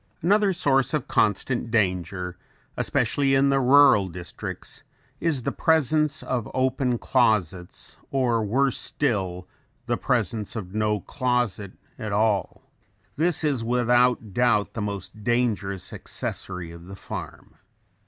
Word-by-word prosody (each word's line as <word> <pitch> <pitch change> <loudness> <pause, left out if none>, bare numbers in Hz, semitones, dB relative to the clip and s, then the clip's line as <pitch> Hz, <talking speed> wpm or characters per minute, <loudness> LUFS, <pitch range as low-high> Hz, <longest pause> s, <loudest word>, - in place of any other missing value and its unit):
Another 205 +3 +3
source 135 -5 +2
of 150 - -3
constant 115 +3 0
danger 90 -4 -1 0.4
especially 135 -1 +1
in 135 +1 +4
the 135 0 +3
rural 135 -6 +6
districts 90 -1 -7 0.4
is 155 -7 0
the - - -1
presence 155 -2 +2
of 120 -4 -2
open 130 -1 +1
closets 100 -9 0
or 120 -4 +1
worse 130 +5 +1
still 95 -9 -1 0.4
the - - 0
presence 110 -2 -1
of 95 -4 -6
no 105 -1 0
closet 125 -7 -1 0.3
at 110 -3 -4
all. 105 -2 0 0.5
This 165 +2 +1
is 140 -6 0
without 120 -2 +2
doubt 120 -3 +2
the 115 - -4
most 105 +1 -6
dangerous 105 -5 -1
accessory 90 -2 -5
of 85 +1 -12
the 95 - -8
farm. - - -8
120 Hz, 125 wpm, -25 LUFS, 100-135 Hz, 0.5 s, rural